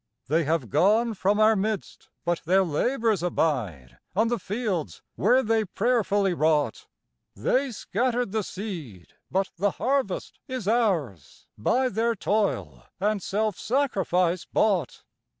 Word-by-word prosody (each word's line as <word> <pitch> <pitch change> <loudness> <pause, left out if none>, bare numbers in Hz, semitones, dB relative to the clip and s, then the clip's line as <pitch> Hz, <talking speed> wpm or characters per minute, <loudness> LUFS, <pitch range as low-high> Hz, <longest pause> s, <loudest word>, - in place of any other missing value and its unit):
They 160 +2 +2
have 145 - -1
gone 220 +5 +3
from 205 +1 +1
our 215 +1 +5
midst, 210 +1 -3 0.2
but 175 0 0
their 190 +3 +4
labors 220 - 0
abide 120 - -1 0.2
On 220 +3 +3
the 240 -1 0
fields 200 -5 -3
where 255 +2 +3
they 225 0 +2
prayerfully 205 -2 +1
wrought; 150 -6 +1 0.5
They 260 - +1
scattered 240 +2 -1
the 220 +1 0
seed, 170 - -7 0.2
but 190 +1 0
the 200 +4 +2
harvest 260 -7 -1
is 255 -6 -5
ours, 180 - -1
By 255 - +1
their 230 0 0
toil 100 - -1
and 205 +1 0
self 210 +1 -1
sacrifice 185 -9 +1
bought. 190 - 0
200 Hz, 130 wpm, -26 LUFS, 165-225 Hz, 0.5 s, our